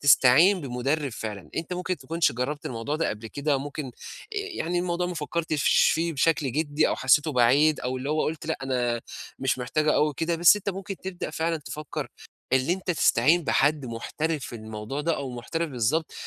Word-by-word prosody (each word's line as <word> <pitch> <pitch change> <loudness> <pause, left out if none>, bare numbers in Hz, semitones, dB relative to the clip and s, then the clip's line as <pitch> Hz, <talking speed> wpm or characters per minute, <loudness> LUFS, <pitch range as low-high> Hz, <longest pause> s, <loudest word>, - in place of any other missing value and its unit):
تستعين 145 +7 +6
بمٌدرِّب 140 +2 -1
فعلًا. 105 -4 -6
أنت 165 +2 -3
ممكن 180 0 -2
تكُونش 165 +4 0
جرّبت 135 +5 -3
الموضوع 120 +5 -3
ده 165 - 0
قبل 105 +2 -5
كده، 140 +4 -1
ممكن 145 +2 -5
آآ - - -7 0.4
يعني 395 - -2
الموضوع 175 0 -1
ما 180 - -4
فكّرتش 155 -1 +2
فيه 165 +1 0
بشكل 145 -2 +1
جِدّي، 150 +1 +1
أو - - -1
حسّيته 150 +4 +3
بعيد 140 +5 +4
أو 130 +1 -2
اللي 130 +3 -3
هو 155 0 +1
قُلت 160 +1 -4
لأ 160 - -2
أنا 120 -3 0 0.4
مش 135 -1 0
محتاجه 150 +5 +1
أوي 150 -1 +2
كده، 165 +2 0
بس 175 +5 +7
أنت 205 - -5
ممكن 195 0 -6
تبدأ 185 -3 -5
فعلًا 165 +1 -1
تفكّر 150 -2 -6 0.4
اللي 130 +5 +3
أنت 185 0 -3
تستعين 170 0 +3
بحد 145 0 +2
محترف 150 +6 -3
في 120 - -7
الموضوع 110 +4 -6
ده 165 +2 0
أو 135 - -4
محترف 155 +7 -3
بالضبط 135 +6 0
150 Hz, 185 wpm, -26 LUFS, 130-165 Hz, 0.4 s, بس